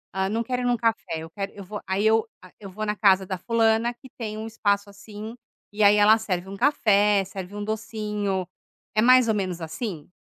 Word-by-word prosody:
hã, 190 0 0
não 225 +2 -1
quero 250 +1 -2
ir - - -2
em - - +2
um 245 - +2
café, 225 -8 -1
eu 160 0 -8
quero 195 +3 -5
eu 200 - -10
vou" 205 +2 -7
Aí 190 +2 0
eu 220 +1 +3 0.2
hã, 185 - -14
eu 200 -2 -9
vou 210 +3 -6
na 210 0 -1
casa 195 -3 +4
da 185 -1 -3
fulana 230 +3 +1
que 260 +2 -16
tem 215 -3 -5
um 220 - -5
espaço 205 -2 0
assim, 210 +2 -9 0.4
e 210 +1 0
aí 205 0 +7
ela 210 +2 +6
serve 190 -4 -3
um 195 - -7
café, 210 -6 +3
serve 190 +1 -8
um 205 - -4
docinho. 210 -3 -3 0.5
É 215 - +4
mais 255 +1 +6
ou 220 - +2
menos 185 -4 -3
assim? 160 0 -5
210 Hz, 230 wpm, -25 LUFS, 195-225 Hz, 0.5 s, aí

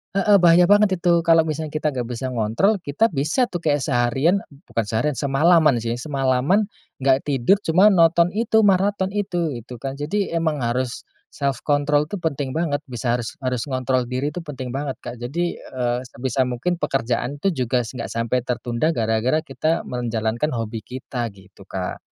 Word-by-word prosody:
heeh 200 +1 +5
bahaya 175 0 +6
banget 205 +1 +4
itu 170 -1 +2
kalau 165 -1 +6
misalnya 155 -1 -4
kita 155 0 0
nggak 125 -3 -3
bisa 125 +2 -4
ngontrol, 125 - +1
kita 180 +9 +1
bisa 155 - 0
tuh 175 - -3
kayak 145 -4 0
seharian 135 +8 +2 0.2
bukan 115 - -2
seharian, 115 +8 0
semalaman 150 +1 +4
sih, 120 +1 -2
semalaman 140 - +1 0.3
nggak 135 +1 +2
tidur 145 +8 +3
cuma 185 +6 +6
nonton 170 -1 +4
itu, 220 +1 +2
maraton 195 0 +2
itu, 175 -6 -1
itu 120 0 -8
kan. 135 +3 -6
Jadi 195 +7 -1
emang 160 -5 -1
harus 125 +1 -2 0.2
self 140 -3 -2
control 145 +1 +2
tuh 205 - -5
penting 140 -4 -2
banget, 160 -3 0
bisa 120 0 -1
harus 120 +7 -6
harus 125 +1 -2
ngontrol 130 -1 0
diri 130 +4 -2
itu - - -5
penting 135 -7 -7
banget, 135 0 -3
Kak. 120 0 -7
Jadi, 165 +9 -3
eee, 125 -1 -2
sebisa 130 +2 -1
mungkin 150 +9 -2
pekerjaan 120 +1 -1
itu 195 - +3 0.2
juga 125 +1 +1
nggak 120 +3 -6
sampai 115 +2 -1
tertunda 125 +5 -1
gara-gara 115 +7 +1
kita 160 +1 -1
menjalankan 120 +2 -2
hobi 115 -1 -3
kita, 125 0 -5
gitu 95 0 -17
Kak. 95 -1 -4
140 Hz, 170 wpm, -22 LUFS, 120-170 Hz, 0.3 s, bahaya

